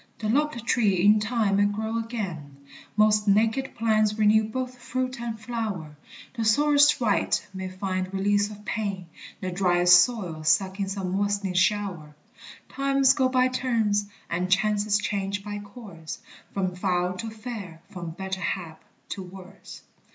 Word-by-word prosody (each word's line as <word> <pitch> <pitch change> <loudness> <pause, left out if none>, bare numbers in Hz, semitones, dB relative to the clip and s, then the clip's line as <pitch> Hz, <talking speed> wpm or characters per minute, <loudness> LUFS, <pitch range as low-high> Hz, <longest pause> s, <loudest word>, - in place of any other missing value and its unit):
The 215 - -3
lopped 270 -2 0
tree 200 -7 +2
in 210 +1 +6
time 215 -2 +1
may 205 - +4
grow 220 +2 -2
again; 185 - -5 0.4
Most 215 0 +4
naked 225 +6 +2
plants 215 -2 +2
renew 215 0 +4
both 255 +3 -5
fruit 255 +1 -3
and 230 -2 -4
flower; 210 -9 -4 0.4
The 230 -3 -3
sorest 290 +5 +4
wight 220 -5 +1
may 190 0 -5
find 185 0 -3
release 205 +1 +1
of 210 0 -12
pain, 200 -5 -3 0.4
The 185 -1 -3
driest 175 -1 +5
soil 185 -10 -4
suck 190 +5 +2
in 195 -1 -1
some 195 -2 -3
moist'ning 200 -1 0
shower; 185 -6 0 0.5
Times 275 0 +3
go 260 -2 +2
by 255 0 +3
turns 225 -5 0 0.2
and 180 +2 -2
chances 205 +2 +2
change 200 -1 -2
by 205 0 -5
course, 200 -6 -9 0.3
From 185 -2 -2
foul 180 -1 0
to 225 +4 -4
fair, 215 -7 -8
from 175 -4 -6
better 190 +3 -5
hap 170 -3 -4 0.3
to 195 - -5
worse. 185 +1 -12
205 Hz, 150 wpm, -26 LUFS, 185-225 Hz, 0.5 s, in